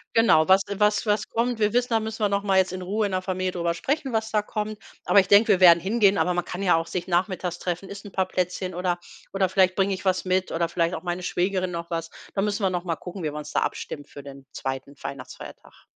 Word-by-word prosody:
Genau, 225 Hz, -9 st, +5 dB
was 195 Hz, +1 st, +6 dB
was 210 Hz, +2 st, +2 dB
was 210 Hz, 0 st, 0 dB
kommt. 235 Hz, 0 st, -1 dB
Wir 210 Hz, -1 st, +2 dB
wissen, 245 Hz, +1 st, +2 dB
da 225 Hz, -, +3 dB
müssen 220 Hz, 0 st, -5 dB
wir 205 Hz, -, +4 dB
noch 200 Hz, 0 st, -1 dB
mal 195 Hz, -2 st, +2 dB
jetzt 190 Hz, -1 st, +2 dB
in 185 Hz, -, -5 dB
Ruhe 205 Hz, +4 st, -1 dB
in 195 Hz, -, -3 dB
der 185 Hz, -, 0 dB
Familie 185 Hz, 0 st, -2 dB
drüber 170 Hz, -1 st, -1 dB
sprechen, 275 Hz, -, -2 dB
was 220 Hz, 0 st, -1 dB
da 215 Hz, -1 st, +1 dB
kommt. 210 Hz, 0 st, -4 dB, 0.3 s
Aber 200 Hz, -, +6 dB
ich 190 Hz, -, -7 dB
denke, 205 Hz, +2 st, +6 dB
wir 190 Hz, -, +4 dB
werden 170 Hz, -2 st, +8 dB
hingehen, 200 Hz, +1 st, +3 dB
aber 180 Hz, +2 st, +2 dB
man 175 Hz, -, -1 dB
kann 180 Hz, +2 st, -6 dB
ja 180 Hz, -4 st, +4 dB
auch 165 Hz, 0 st, -1 dB
sich 180 Hz, 0 st, -4 dB
nachmittags 180 Hz, -1 st, -1 dB
treffen, 180 Hz, +2 st, -3 dB
isst 200 Hz, 0 st, -9 dB
ein 205 Hz, -, -10 dB
paar 190 Hz, 0 st, 0 dB
Plätzchen 185 Hz, 0 st, -3 dB
oder 180 Hz, -1 st, -1 dB, 0.3 s
oder 195 Hz, -1 st, +1 dB
vielleicht 185 Hz, 0 st, +3 dB
bringe 195 Hz, 0 st, +1 dB
ich 190 Hz, -, -6 dB
was 185 Hz, 0 st, 0 dB
mit 185 Hz, 0 st, 0 dB
oder 165 Hz, 0 st, 0 dB
vielleicht 170 Hz, +1 st, 0 dB
auch -, -, -7 dB
meine 175 Hz, 0 st, -3 dB
Schwägerin 185 Hz, 0 st, -1 dB
noch 170 Hz, 0 st, -5 dB
was. 165 Hz, 0 st, -3 dB, 0.2 s
Da 195 Hz, -, 0 dB
müssen 205 Hz, +1 st, -1 dB
wir 190 Hz, -, +3 dB
noch 180 Hz, -1 st, -2 dB
mal 165 Hz, -3 st, -2 dB
gucken, 180 Hz, +1 st, -8 dB
wie 150 Hz, -, -1 dB
wir 150 Hz, -, -7 dB
uns 150 Hz, 0 st, -7 dB
da -, -, +2 dB
abstimmt 145 Hz, -1 st, -4 dB
für 145 Hz, -, -10 dB
den 135 Hz, -1 st, -12 dB
2. 135 Hz, +1 st, -5 dB
Weihnachtsfeiertag. 135 Hz, 0 st, -10 dB
185 Hz, 265 wpm, -25 LUFS, 175-205 Hz, 0.3 s, werden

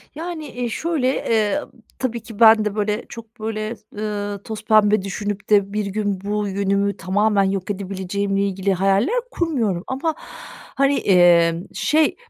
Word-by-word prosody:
Yani, 325 Hz, -1 st, -5 dB
eee, 245 Hz, -1 st, -4 dB
şöyle, 310 Hz, +1 st, -1 dB
eee, 220 Hz, -3 st, +1 dB
ı -, -, -13 dB, 0.3 s
tabii 240 Hz, -3 st, -2 dB
ki 225 Hz, -4 st, -11 dB
ben 220 Hz, -1 st, +7 dB
de, 210 Hz, -1 st, -2 dB
böyle, 210 Hz, +1 st, -1 dB
çok, 230 Hz, 0 st, -11 dB
böyle, 215 Hz, +1 st, -3 dB, 0.2 s
ııı, 205 Hz, -1 st, -4 dB
tozpembe 215 Hz, -1 st, +2 dB
düşünüp 205 Hz, +1 st, -5 dB
de 200 Hz, -1 st, +3 dB
bir 210 Hz, 0 st, -1 dB
gün 200 Hz, -1 st, -2 dB
bu 205 Hz, +1 st, -2 dB
yönümü 200 Hz, +1 st, 0 dB
tamamen 205 Hz, +3 st, +2 dB
yok 195 Hz, 0 st, -1 dB
edebileceğimle 195 Hz, 0 st, -2 dB
ilgili 195 Hz, 0 st, 0 dB
hayaller 195 Hz, -, +2 dB, 0.2 s
kurmuyorum 230 Hz, -, -1 dB
ama, 300 Hz, +4 st, -2 dB, 0.6 s
hani, 275 Hz, +1 st, +3 dB
emm, 175 Hz, -2 st, +4 dB
şey, 310 Hz, 0 st, +2 dB
210 Hz, 145 wpm, -21 LUFS, 195-225 Hz, 0.6 s, ben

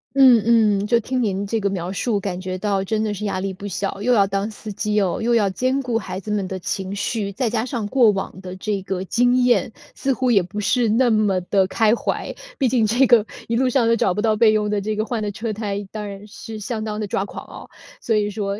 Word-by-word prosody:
嗯 230 Hz, -5 st, +5 dB
嗯， 205 Hz, -, -2 dB
就 235 Hz, +1 st, +3 dB
听 255 Hz, +2 st, -2 dB
您 200 Hz, -2 st, -1 dB
这 225 Hz, +2 st, -1 dB
个 200 Hz, -1 st, 0 dB
描 185 Hz, -1 st, -3 dB
述， 205 Hz, +1 st, -1 dB
感 185 Hz, -2 st, -4 dB
觉 185 Hz, 0 st, -4 dB
到 200 Hz, -1 st, 0 dB
真 215 Hz, +2 st, -1 dB
的 210 Hz, -1 st, -1 dB
是 210 Hz, +1 st, -6 dB
压 190 Hz, -2 st, -1 dB
力 195 Hz, 0 st, -3 dB
不 200 Hz, +2 st, -8 dB
小， 195 Hz, +1 st, -3 dB
又 250 Hz, +3 st, +2 dB
要 200 Hz, -3 st, +5 dB
当 195 Hz, +2 st, -2 dB
司 215 Hz, 0 st, -8 dB
机 210 Hz, +1 st, -2 dB
哟， 195 Hz, -2 st, +1 dB
又 235 Hz, +1 st, +2 dB
要 210 Hz, -3 st, +3 dB
兼 255 Hz, +8 st, 0 dB
顾 240 Hz, -3 st, -1 dB
孩 185 Hz, -2 st, -6 dB
子 210 Hz, +2 st, -6 dB
们 200 Hz, -3 st, -1 dB
的 190 Hz, -, -4 dB
情 190 Hz, +2 st, -4 dB
绪， 205 Hz, 0 st, -2 dB
再 235 Hz, +3 st, -1 dB
加 225 Hz, -1 st, 0 dB
上 235 Hz, -5 st, -3 dB
过 240 Hz, -2 st, +4 dB
往 195 Hz, -1 st, -3 dB
的 185 Hz, -1 st, -7 dB
这 200 Hz, +1 st, -3 dB
个 190 Hz, -1 st, -3 dB
经 245 Hz, +5 st, +2 dB
验， 245 Hz, -1 st, +2 dB, 0.2 s
似 270 Hz, -, -1 dB
乎 250 Hz, 0 st, 0 dB
也 200 Hz, -4 st, +5 dB
不 190 Hz, +4 st, -6 dB
是 240 Hz, +3 st, +2 dB
那 235 Hz, +3 st, +3 dB
么 210 Hz, -4 st, +2 dB
地 190 Hz, +1 st, +1 dB
开 220 Hz, +2 st, +2 dB
怀。 -, -, -3 dB, 0.2 s
毕 265 Hz, -, +2 dB
竟 235 Hz, -2 st, +2 dB
这 245 Hz, +5 st, +4 dB
个 235 Hz, -4 st, +5 dB, 0.2 s
一 230 Hz, -, -1 dB
路 255 Hz, +2 st, +2 dB
上， 245 Hz, -2 st, +2 dB
都 230 Hz, -, +4 dB
找 200 Hz, -, +1 dB
不 210 Hz, -, -2 dB
到 220 Hz, -1 st, +2 dB
备 220 Hz, 0 st, +5 dB
用 210 Hz, -1 st, +1 dB
的 205 Hz, -1 st, 0 dB
这 215 Hz, +1 st, -2 dB
个 215 Hz, -, -1 dB
换 230 Hz, -2 st, -3 dB
的 205 Hz, -1 st, -2 dB
车 220 Hz, +2 st, -4 dB
胎， 205 Hz, -1 st, -4 dB
当 210 Hz, -1 st, -5 dB
然 200 Hz, +1 st, -9 dB
是 220 Hz, 0 st, -9 dB
相 215 Hz, +1 st, -4 dB
当 215 Hz, -1 st, -4 dB
地 215 Hz, -, -2 dB
抓 195 Hz, -1 st, -1 dB
狂 -, -, -9 dB
哦。 -, -, -11 dB, 0.3 s
所 225 Hz, -, 0 dB
以 210 Hz, 0 st, +1 dB
说， 200 Hz, -1 st, -3 dB
210 Hz, 280 characters per minute, -21 LUFS, 195-230 Hz, 0.3 s, 嗯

